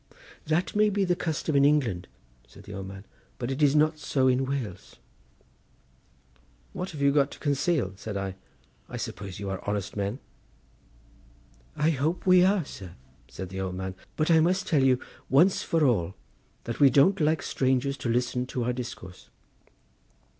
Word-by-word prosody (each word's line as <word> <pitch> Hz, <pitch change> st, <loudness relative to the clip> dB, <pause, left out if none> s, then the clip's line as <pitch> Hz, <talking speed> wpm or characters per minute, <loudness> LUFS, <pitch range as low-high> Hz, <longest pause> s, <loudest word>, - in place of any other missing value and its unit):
"That 160 Hz, +6 st, 0 dB
may 210 Hz, 0 st, +4 dB
be 200 Hz, -1 st, +1 dB
the 180 Hz, -1 st, +1 dB
custom 160 Hz, -3 st, -2 dB
in 140 Hz, -, +5 dB
England," 125 Hz, -12 st, +2 dB, 0.4 s
said -, -, -15 dB
the 100 Hz, -, -10 dB
old 95 Hz, -1 st, -6 dB
man; 95 Hz, +1 st, -10 dB, 0.3 s
"but 120 Hz, +1 st, -3 dB
it 135 Hz, +3 st, -3 dB
is 145 Hz, -1 st, +4 dB
not 155 Hz, +1 st, +3 dB
so 135 Hz, -3 st, +1 dB
in 130 Hz, +1 st, +2 dB
Wales." 120 Hz, -9 st, -5 dB, 1.8 s
"What 180 Hz, +1 st, -4 dB
have 145 Hz, -3 st, -5 dB
you 140 Hz, -, +5 dB
got 140 Hz, -1 st, +3 dB
to -, -, -11 dB
conceal?" 140 Hz, -, 0 dB
said 100 Hz, 0 st, -5 dB
I. 95 Hz, -1 st, -3 dB, 0.6 s
"I -, -, -6 dB
suppose 95 Hz, -3 st, -6 dB
you 100 Hz, -, -5 dB
are 95 Hz, -, -4 dB
honest 105 Hz, -1 st, -3 dB
men." 100 Hz, +3 st, -2 dB, 1.6 s
"I 155 Hz, +2 st, +2 dB
hope 155 Hz, +4 st, -1 dB
we 185 Hz, -1 st, +6 dB
are, 190 Hz, -3 st, +2 dB
sir," 95 Hz, -9 st, -10 dB, 0.3 s
said 95 Hz, -, -7 dB
the 95 Hz, +1 st, -5 dB
old 95 Hz, -1 st, -3 dB
man; 95 Hz, 0 st, -4 dB, 0.2 s
"but 155 Hz, +2 st, +1 dB
I 160 Hz, -, +6 dB
must 180 Hz, +4 st, +2 dB
tell 150 Hz, -4 st, +2 dB
you, 130 Hz, -1 st, +4 dB, 0.3 s
once 170 Hz, +8 st, +4 dB
for 165 Hz, -2 st, +1 dB
all, 95 Hz, -8 st, +1 dB, 0.5 s
that 115 Hz, -, -5 dB
we 140 Hz, -2 st, +7 dB
don't 145 Hz, +10 st, +4 dB
like 155 Hz, +1 st, +2 dB
strangers 130 Hz, +1 st, 0 dB
to 130 Hz, -3 st, -3 dB
listen 125 Hz, +1 st, 0 dB
to 125 Hz, -1 st, -3 dB
our 125 Hz, +1 st, 0 dB
discourse." 115 Hz, -7 st, -8 dB
135 Hz, 175 wpm, -27 LUFS, 100-155 Hz, 1.8 s, we